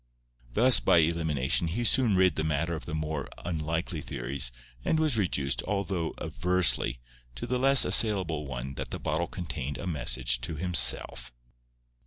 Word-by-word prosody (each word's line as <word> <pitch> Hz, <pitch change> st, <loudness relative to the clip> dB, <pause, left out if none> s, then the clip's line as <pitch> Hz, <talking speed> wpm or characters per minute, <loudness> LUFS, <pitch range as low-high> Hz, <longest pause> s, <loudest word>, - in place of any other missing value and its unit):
Thus 125 Hz, +1 st, +6 dB
by -, -, +3 dB
elimination 80 Hz, -2 st, +1 dB
he 105 Hz, +9 st, -3 dB
soon 120 Hz, -3 st, +3 dB
rid 95 Hz, -3 st, +3 dB
the 80 Hz, -, -2 dB
matter 80 Hz, +2 st, -1 dB
of 80 Hz, -, -8 dB
the 80 Hz, -, -4 dB
more 75 Hz, -2 st, -4 dB, 0.2 s
unlikely 80 Hz, 0 st, -3 dB
theories, 70 Hz, -2 st, -3 dB, 0.3 s
and 160 Hz, -, 0 dB
was 155 Hz, -5 st, +2 dB
reduced—though 95 Hz, 0 st, -2 dB
aversely—to -, -, -1 dB
the 125 Hz, 0 st, -2 dB
less 135 Hz, +1 st, +6 dB
assailable 90 Hz, -9 st, +1 dB
one 65 Hz, 0 st, -6 dB
that -, -, -5 dB
the -, -, -5 dB
bottle 85 Hz, +2 st, -2 dB
contained 75 Hz, -6 st, -6 dB
a -, -, -7 dB
message 65 Hz, -6 st, -1 dB
to 60 Hz, +6 st, -4 dB
himself. 65 Hz, -6 st, +2 dB
80 Hz, 145 wpm, -28 LUFS, 70-90 Hz, 0.3 s, Thus